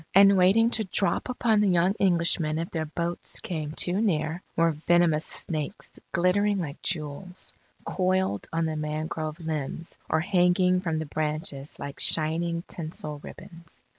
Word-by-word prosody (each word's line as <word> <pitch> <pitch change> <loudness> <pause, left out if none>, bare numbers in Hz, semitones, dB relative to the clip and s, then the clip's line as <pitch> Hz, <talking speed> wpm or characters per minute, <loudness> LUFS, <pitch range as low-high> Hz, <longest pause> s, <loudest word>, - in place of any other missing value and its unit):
And 200 0 +8
waiting 200 +6 +5
to 220 - +1
drop 200 +4 0
upon 230 -3 +2
the 205 -2 +3
young 180 +2 +3
Englishmen 170 -4 +2
if 165 +1 -3
their 160 -2 -2
boats 170 +2 -3
came 155 -4 -4
too 180 +4 +1
near, 165 -4 0
were 165 0 +3
venomous 160 0 +2
snakes 155 +4 -3 0.2
glittering 200 +4 +2
like 160 -4 -5
jewels, 175 +2 -3 0.3
coiled 185 - 0
on 165 0 0
the 160 -1 -2
mangrove 155 +1 -3
limbs 160 0 -5
or 160 - +2
hanging 180 0 +3
from 165 -3 -1
the 160 - -2
branches 150 -1 -3
like 140 0 -7
shining 170 +2 +2
tinsel 155 -3 -6
ribbons. 165 +2 -12
170 Hz, 145 wpm, -27 LUFS, 155-185 Hz, 0.3 s, And